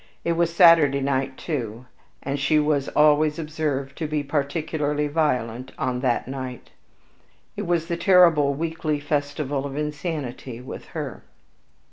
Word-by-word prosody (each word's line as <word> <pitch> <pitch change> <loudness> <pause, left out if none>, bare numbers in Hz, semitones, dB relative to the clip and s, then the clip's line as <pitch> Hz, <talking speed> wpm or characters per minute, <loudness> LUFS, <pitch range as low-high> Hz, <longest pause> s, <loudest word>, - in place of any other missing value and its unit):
It 170 - +1
was 170 0 +1
Saturday 165 -5 +6
night 135 -1 -1
too, 120 -6 -4 0.4
and 140 +1 -2
she 135 +3 +2
was 150 -2 +1
always 150 0 +4
observed 150 -4 -3
to 160 - -2
be 150 -1 -1
particularly 150 +1 -1
violent 130 -5 -1
on 125 -1 -1
that 125 -2 0
night, 130 -2 -7 0.8
it - - -4
was 170 -2 +1
the 170 0 -3
terrible 170 -6 +5
weekly 160 -1 -2
festival 145 -1 -2
of 140 0 -5
insanity 145 -5 -4
with 125 - -8
her. - - -5
145 Hz, 135 wpm, -24 LUFS, 135-155 Hz, 0.8 s, Saturday